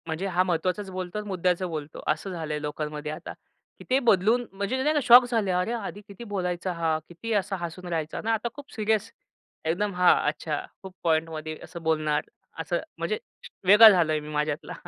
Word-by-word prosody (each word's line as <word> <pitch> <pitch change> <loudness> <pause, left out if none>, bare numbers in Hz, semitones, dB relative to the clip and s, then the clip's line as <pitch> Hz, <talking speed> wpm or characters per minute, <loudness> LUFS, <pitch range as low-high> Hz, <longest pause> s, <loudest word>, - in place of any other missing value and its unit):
म्हणजे 160 +4 -3
हा 180 -1 +2
महत्त्वाचाच 185 +3 -1
बोलतो 185 +1 -5
आणि 210 0 -4
मुद्द्याचं 185 -1 0
बोलतो, 155 -2 -6
असं 155 +6 -1
झालंय 155 -4 -4
लोकांमध्ये 150 0 -4
आता. 155 - -7 0.5
की - - -10
ते 260 +1 +4
बदलून, 230 0 +3
म्हणजे 200 +7 -2
नाही 305 +2 +2
का? - - +4
शॉक 245 0 +9
झाले, 220 -5 +1
"अरे! 180 +4 0
आधी 205 -3 -5
किती 200 +3 -10
बोलायचा 185 -4 -2
हा. 165 -2 0
किती 220 +7 -5
असा 200 -1 0
हसून 175 +1 -6
राहायचा 160 -2 -3
ना. 225 +1 +1
आता 225 +1 -1
खूप 285 -1 -12
सीरियस, 220 0 0 0.5
एकदम." 195 +5 0
हां. 180 0 +6
अच्छा 150 0 -2 0.2
खूप 190 -1 -9
पॉइंटमध्ये 155 -1 -1
असं 170 0 -9
बोलणार, 155 -2 +1 0.4
असं. - - -1 0.2
म्हणजे 435 - -1 0.5
वेगळा 215 +3 +10
झालोय 165 -6 +3
मी 150 0 -9
माझ्यातला. 150 0 -2
180 Hz, 180 wpm, -26 LUFS, 160-210 Hz, 0.5 s, वेगळा